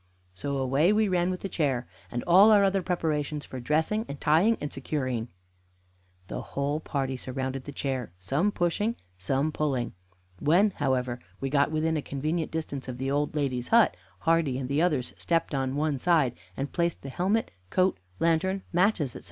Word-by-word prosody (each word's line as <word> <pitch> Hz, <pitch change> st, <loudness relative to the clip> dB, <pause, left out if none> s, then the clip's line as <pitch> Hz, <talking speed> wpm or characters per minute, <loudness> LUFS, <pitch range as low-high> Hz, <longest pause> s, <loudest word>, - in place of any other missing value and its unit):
So 140 Hz, +9 st, -3 dB
away 135 Hz, +7 st, +3 dB
we 215 Hz, 0 st, +3 dB
ran 180 Hz, -1 st, +1 dB
with 185 Hz, 0 st, -3 dB
the -, -, -3 dB
chair, 135 Hz, -9 st, 0 dB, 0.2 s
and 120 Hz, 0 st, -3 dB
all 190 Hz, +5 st, +7 dB
our 210 Hz, -2 st, +6 dB
other 195 Hz, 0 st, +2 dB
preparations 155 Hz, -5 st, -1 dB
for 130 Hz, -, -7 dB
dressing 160 Hz, -, +1 dB
and 140 Hz, -, -6 dB
tying 180 Hz, +10 st, +4 dB
and 150 Hz, -, -4 dB
securing. 130 Hz, -4 st, -2 dB, 1.0 s
The -, -, -5 dB
whole 140 Hz, +2 st, -2 dB
party 135 Hz, -4 st, -2 dB
surrounded 130 Hz, +1 st, -4 dB
the 145 Hz, -, -6 dB
chair, 130 Hz, -7 st, -3 dB
some 140 Hz, -, 0 dB
pushing, 205 Hz, +6 st, 0 dB, 0.2 s
some 135 Hz, +11 st, 0 dB
pulling. 135 Hz, -7 st, -1 dB, 0.5 s
When, 180 Hz, +8 st, +4 dB
however, 130 Hz, -6 st, -1 dB, 0.2 s
we 135 Hz, -1 st, -3 dB
got 140 Hz, -1 st, +3 dB
within 160 Hz, +1 st, 0 dB
a -, -, -1 dB
convenient 155 Hz, +4 st, -2 dB
distance 150 Hz, -5 st, -4 dB
of 125 Hz, -1 st, -5 dB
the 135 Hz, +1 st, -2 dB
old 145 Hz, +1 st, 0 dB
lady's 130 Hz, -4 st, -1 dB
hut, 230 Hz, -2 st, +5 dB, 0.3 s
Hardy 165 Hz, -6 st, +2 dB
and 130 Hz, -1 st, -3 dB
the 140 Hz, +3 st, +1 dB
others 150 Hz, -8 st, +1 dB
stepped 165 Hz, -2 st, 0 dB
on 135 Hz, -1 st, -1 dB
one 145 Hz, -2 st, 0 dB
side, 155 Hz, -6 st, +3 dB, 0.2 s
and 140 Hz, +1 st, -3 dB
placed 170 Hz, -1 st, 0 dB
the 135 Hz, -, -6 dB
helmet, 195 Hz, +10 st, 0 dB, 0.2 s
coat, 185 Hz, -, +2 dB, 0.2 s
lantern, 185 Hz, +4 st, +1 dB
matches, 175 Hz, -, +2 dB
etc. -, -, -6 dB
150 Hz, 175 wpm, -28 LUFS, 135-175 Hz, 1.0 s, all